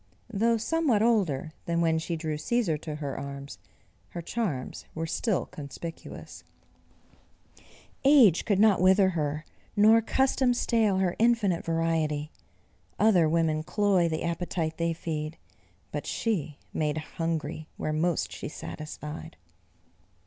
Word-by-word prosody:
Though 230 Hz, +3 st, +3 dB
somewhat 255 Hz, -3 st, +1 dB
older 180 Hz, -, +1 dB
than 170 Hz, 0 st, 0 dB
when 165 Hz, -1 st, +2 dB
she 165 Hz, +1 st, -3 dB
drew 155 Hz, -1 st, -3 dB
Cæsar 165 Hz, -2 st, 0 dB
to 155 Hz, -2 st, -5 dB
her 145 Hz, -3 st, -4 dB
arms, 140 Hz, 0 st, -7 dB, 0.5 s
her 175 Hz, -, -6 dB
charms 170 Hz, -, -3 dB
were 160 Hz, 0 st, -2 dB
still 185 Hz, +4 st, 0 dB
conspicuous; 155 Hz, +3 st, -9 dB, 1.6 s
"Age 265 Hz, -, +6 dB
could 200 Hz, -4 st, +1 dB
not 210 Hz, -4 st, +5 dB
wither 190 Hz, +1 st, +5 dB
her, 155 Hz, -3 st, -2 dB, 0.3 s
nor 220 Hz, +2 st, +6 dB
custom 260 Hz, +1 st, +2 dB
stale 220 Hz, -5 st, +2 dB
Her 185 Hz, -2 st, +1 dB
infinite 225 Hz, -7 st, +2 dB
variety. 160 Hz, -2 st, 0 dB, 0.7 s
Other 185 Hz, -7 st, +4 dB
women 160 Hz, -1 st, +1 dB
cloy 190 Hz, 0 st, +2 dB
The 160 Hz, -1 st, -2 dB
appetite 170 Hz, -1 st, -2 dB
they 165 Hz, 0 st, 0 dB
feed. 155 Hz, -1 st, -4 dB, 0.5 s
But 145 Hz, -, -4 dB
she 165 Hz, -10 st, -2 dB, 0.2 s
made 150 Hz, -1 st, 0 dB
hungry 155 Hz, -1 st, -3 dB
Where 155 Hz, -, -2 dB
most 165 Hz, +1 st, 0 dB
she -, -, -6 dB
satisfied." 155 Hz, +1 st, -7 dB
165 Hz, 125 wpm, -28 LUFS, 155-210 Hz, 1.6 s, Age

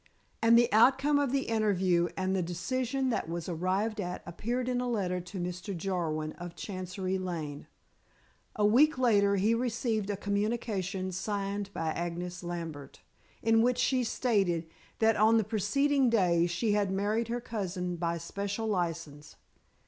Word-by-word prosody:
And 230 Hz, 0 st, +6 dB
the 240 Hz, -1 st, +3 dB
outcome 270 Hz, +6 st, +5 dB
of 280 Hz, -3 st, +1 dB
the 275 Hz, 0 st, +1 dB
interview 190 Hz, -6 st, +2 dB
and 190 Hz, 0 st, 0 dB
of -, -, +1 dB
the 190 Hz, -, +1 dB
decision 255 Hz, +10 st, -1 dB
that 190 Hz, -, -2 dB
was 170 Hz, -1 st, -4 dB
arrived 190 Hz, +5 st, -1 dB
at 180 Hz, -1 st, -5 dB
appeared 235 Hz, +9 st, -3 dB
in 250 Hz, -1 st, 0 dB
a 250 Hz, -, -2 dB
letter 185 Hz, -6 st, -1 dB
to 185 Hz, +2 st, -8 dB
Mr. 180 Hz, +2 st, -4 dB
Jarwin, 165 Hz, -4 st, -2 dB
of 175 Hz, -1 st, -7 dB
Chancery 185 Hz, -1 st, -4 dB
Lane. 160 Hz, -6 st, -5 dB, 0.9 s
A 210 Hz, -, +2 dB
week 275 Hz, +8 st, +5 dB
later 205 Hz, -5 st, +3 dB
he 205 Hz, +4 st, +2 dB
received 230 Hz, -3 st, -1 dB
a 205 Hz, -, -1 dB
communication 200 Hz, -2 st, -2 dB
signed 200 Hz, +1 st, -3 dB
by 165 Hz, -4 st, -2 dB
Agnes 175 Hz, +2 st, -4 dB
Lambert, 165 Hz, -5 st, -6 dB, 0.4 s
in 225 Hz, 0 st, +4 dB
which 245 Hz, +1 st, +2 dB
she 255 Hz, -2 st, +2 dB
stated 195 Hz, -9 st, 0 dB, 0.3 s
that 225 Hz, 0 st, +3 dB
on 220 Hz, +2 st, +5 dB
the 220 Hz, -, +3 dB
preceding 255 Hz, +6 st, +2 dB
day 175 Hz, -6 st, +3 dB
she 175 Hz, +6 st, 0 dB
had 205 Hz, -1 st, +2 dB
married 210 Hz, +4 st, 0 dB
her 240 Hz, +1 st, -2 dB
cousin 185 Hz, -6 st, -3 dB
by 170 Hz, 0 st, -1 dB
special 200 Hz, +6 st, -4 dB
license. 165 Hz, -7 st, -3 dB
200 Hz, 155 wpm, -30 LUFS, 175-230 Hz, 0.9 s, And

